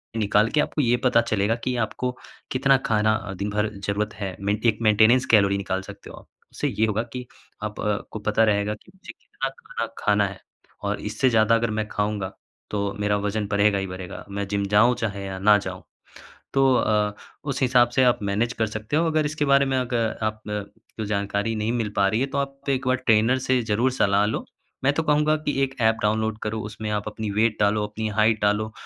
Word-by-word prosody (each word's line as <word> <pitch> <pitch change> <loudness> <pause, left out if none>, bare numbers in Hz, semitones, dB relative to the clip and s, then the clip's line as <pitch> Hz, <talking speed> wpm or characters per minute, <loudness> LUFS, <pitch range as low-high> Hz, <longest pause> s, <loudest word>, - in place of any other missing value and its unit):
निकाल 105 0 +2
के 150 - 0
आपको 150 - -1
ये 120 -2 +3
पता 125 -2 +4
चलेगा 110 -1 0
कि 125 - -1
आपको 120 +2 -2 0.4
कितना 135 +1 +4
खाना 110 -1 +2
अ, 100 -3 -5
दिन 100 +2 -3
भर 105 +1 0 0.2
ज़रूरत 105 +1 -1
है। 95 -3 -5
मेंट 100 +3 -2
एक 110 -2 +3
मेंटेनेंस 115 +4 +5
कैलोरी 100 -2 +5
निकाल 95 -1 -2
सकते 95 - -11
हो - - -10
आप। - - -15 0.2
उससे - - -2
ये 110 - +1
होगा 110 +1 0
कि 125 -1 -5 0.4
आप 105 0 -5
अ, 105 -1 0
को 110 - -5
पता 105 +1 +2
रहेगा 105 -1 +1
कि 145 - -21
मुझे 190 - -11
कितना 135 - -5
खाना 130 -3 -6
खाना 105 -1 +2
है, 95 -1 -9 0.4
और - - -1
इससे 130 - 0
ज़्यादा 115 -1 +4
अगर 115 0 0
मैं 110 0 -2
खाऊँगा 105 -2 -2 0.4
तो 100 -1 -1
मेरा 105 0 +1
वज़न 105 +1 -2
बढ़ेगा 100 0 +3
ही 95 - -3
बढ़ेगा। 95 -1 -8
मैं 100 0 -3
जिम 100 0 -1
जाऊँ, 105 +5 +4
चाहे 100 -4 -3
या 95 -1 -5
ना 105 +2 +6
जाऊँ। 105 - -6 0.7
तो 135 -1 +4
अ, 105 -3 +1 0.3
उस 140 -2 -3
हिसाब 125 -1 +4
से 130 - +2
आप 125 -1 +3
मैनेज 105 +4 0
कर 110 -2 -1
सकते 110 +6 -4
हो। 165 +2 +3
अगर 155 -1 +1
इसके 150 0 -1
बारे 140 0 +4
में 135 -1 0
अग 125 -1 -2 0.3
आप 110 0 -1
न 105 0 -2 0.3
कोई 110 - -3
जानकारी 100 +2 -1
नहीं 110 +2 -1
मिल 115 -3 -1
पा 100 - +4
रही 110 +4 0
है, 135 - +1
तो 140 0 -4
आप 140 0 -4
एक 130 -1 0
बार 130 0 +3
ट्रेनर 120 0 +3
से 130 0 +1
ज़रूर 115 +3 +1
सलाह 100 -4 +2
लो। 110 - -2 0.4
मैं 140 - +4
तो 165 - 0
कहूँगा 150 0 +3
कि 150 -1 -2
एक 135 0 -1
एप 110 0 +3
डाउनलोड 110 +1 0
करो, 110 +1 -2
उसमें 105 0 -6
आप 105 -1 -1
अपनी 110 0 -4
वेट 110 +2 +1
डालो, 105 +1 +2
अपनी 110 +1 -4
हाइट 110 0 +2
डालो। 105 +1 +1
110 Hz, 220 wpm, -24 LUFS, 105-125 Hz, 0.7 s, ना